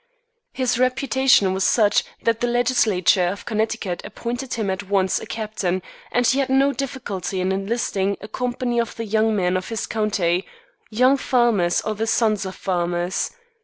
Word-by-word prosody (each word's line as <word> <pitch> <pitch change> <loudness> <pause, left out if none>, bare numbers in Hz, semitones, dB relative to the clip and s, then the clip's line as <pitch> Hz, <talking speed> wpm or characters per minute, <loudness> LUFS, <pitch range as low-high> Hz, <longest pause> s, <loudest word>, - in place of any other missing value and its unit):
His 250 -2 0
reputation 255 -5 +3
was 190 0 -1
such 205 -1 +3 0.2
that 230 -1 +1
the 240 - +2
legislature 225 -7 +2
of 195 +3 -4
Connecticut 215 -4 -2
appointed 245 +2 -5
him 215 -4 -1
at 190 +1 -5
once 190 -2 +2
a - - -9
captain, 200 -5 -2 0.3
and 245 0 +2
he 260 +4 +3
had 270 -1 0
no 270 +1 +3
difficulty 235 -9 -4
in 185 +1 0
enlisting 195 -1 -1
a 210 - -9
company 245 +1 -2
of 230 -1 -2
the 230 - -4
young 220 +1 +1
men 180 -2 +1
of 185 0 -3
his 225 -1 -3
county, 195 -5 0 0.4
young 255 +5 +4
farmers 235 -10 +2
or 215 - -2
the 220 +2 -3
sons 215 -3 +1
of 190 - -7
farmers. 175 -1 -1
215 Hz, 165 wpm, -22 LUFS, 190-245 Hz, 0.4 s, young